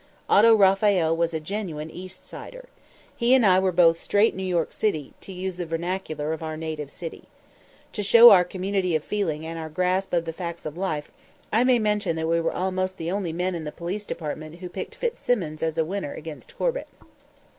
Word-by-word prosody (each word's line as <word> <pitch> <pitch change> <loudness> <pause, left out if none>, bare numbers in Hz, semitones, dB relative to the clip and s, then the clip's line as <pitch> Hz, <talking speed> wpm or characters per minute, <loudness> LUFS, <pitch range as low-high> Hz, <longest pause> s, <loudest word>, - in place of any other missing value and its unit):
Otto 225 +2 +6
Raphael 195 -4 +4
was 170 0 0
a 160 - -2
genuine 160 -3 -5
East 185 +2 -10
Sider. - - -10 0.5
He 240 +2 +4
and 255 -4 +4
I 185 -2 +6
were 190 0 +1
both 165 -2 +4
"straight 205 +5 +2
New 190 - -5
York," 180 -3 0
to 190 -3 -2
use 185 0 -5
the 175 - -3
vernacular 165 -2 -3
of 160 - -6
our 155 -1 -4
native 155 -3 -5
city. 165 +2 -8 0.7
To 210 - -3
show 230 +4 +9
our 180 -2 +7
community 185 -1 -1
of 155 - 0
feeling 160 -7 -2
and 165 0 -5
our 160 -1 -5
grasp 185 +4 0
of 170 -1 +1
the 165 - -4
facts 170 0 -6
of 155 0 -5
life, 165 -5 -3 0.4
I 225 +3 +4
may 255 -1 +4
mention 210 -5 0
that 160 0 -2
we 165 0 +2
were 165 - 0
almost 185 0 -2
the 165 +1 -3
only 190 -4 -2
men 180 +3 -1
in 170 -2 -4
the 150 - -5
Police 185 +6 -5
Department 155 0 -5
who 180 +1 -8
picked 185 - -6
Fitzsimmons 245 - -2
as 160 0 -1
a 160 - +2
winner 190 -3 -4
against 155 -1 -10
Corbett. - - -1
180 Hz, 200 wpm, -25 LUFS, 160-195 Hz, 0.7 s, show